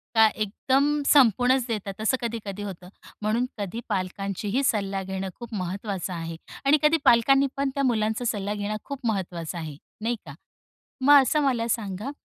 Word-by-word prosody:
का 220 0 +7
एकदम 270 +8 +1
संपूनच 255 -1 +5
देतात 205 -2 -4
असं 255 +4 +2
कधी-कधी 215 -4 -4
होतं. 185 -3 -8 0.3
म्हणून 220 +4 +1
कधी 210 +3 -4
पालकांचीही 200 +4 -2
सल्ला 195 -6 0
घेणं 190 0 -4
खूप 235 -1 -9
महत्त्वाचं 190 0 -3
आहे 165 -1 -5 0.3
आणि 285 +2 +6
कधी 300 +2 +5
पालकांनी 270 +4 +5
पण 275 0 +1
त्या 280 - 0
मुलांचा 220 -1 0
सल्ला 205 -3 -1
घेणं 210 +1 -3
खूप 275 -3 -7
महत्त्वाचं 175 -5 -3
आहे, 155 -4 -6 0.2
नाही 235 +2 0
का? 145 - -9 0.7
मग 285 +1 +7
असं 300 +3 +1
मला 245 -4 +1
सांगा 210 +2 -2
215 Hz, 155 wpm, -25 LUFS, 195-255 Hz, 0.7 s, का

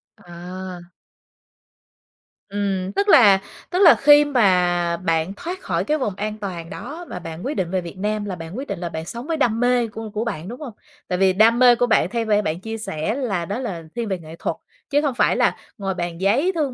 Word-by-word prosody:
À. 180 +1 -8 1.7
Ừm, 195 -2 -2
tức 405 - +1
là 205 - +7 0.3
tức 360 - -1
là 355 -5 +8
khi 290 +1 +6
mà 180 -9 +2
bạn 165 0 -1
thoát 360 +3 -6
khỏi - - -1
cái 305 +1 0
vùng 215 -9 -2
an 210 +2 -4
toàn 175 -5 -6
đó, 335 - -7
mà 180 - -5
bạn 165 +1 -8
quyết 285 - -1
định 175 -2 -1
về 185 -1 0
Việt 170 +1 -9
Nam 210 +1 -2
là 195 -3 -4
bạn 165 +5 -8
quyết 275 +2 -5
định - - -4
là 175 - -4
bạn 160 0 -5
sống 235 - -6
với 325 -1 -1
đam 230 -5 +1
mê 245 -1 +2
của 220 0 -7
của 215 +1 -1
bạn, 170 -6 -4
đúng 240 +3 -7
hông? 250 -7 -7 0.3
Tại 180 - -1
vì 190 0 +4
đam 225 +4 +4
mê 250 -1 +7
của 245 +1 +2
bạn 220 - +3
theo 235 -1 -2
b 220 - -7 0.2
bạn 155 +2 -1
chia 225 +3 -5
sẻ 210 -1 -3
là 210 -11 -2
đó 200 +7 -3
là 185 -10 -5
thiên 235 -1 -2
về 190 -3 -2
nghệ 160 0 -11
thuật, - - -2 0.3
chứ 290 0 +3
không 285 -4 -1
phải - - +3
là - - +2 0.2
ngồi 195 -2 -2
bàn 175 -1 -4
giấy 250 - +2
thương 285 -5 -1
205 Hz, 230 wpm, -22 LUFS, 180-245 Hz, 1.7 s, là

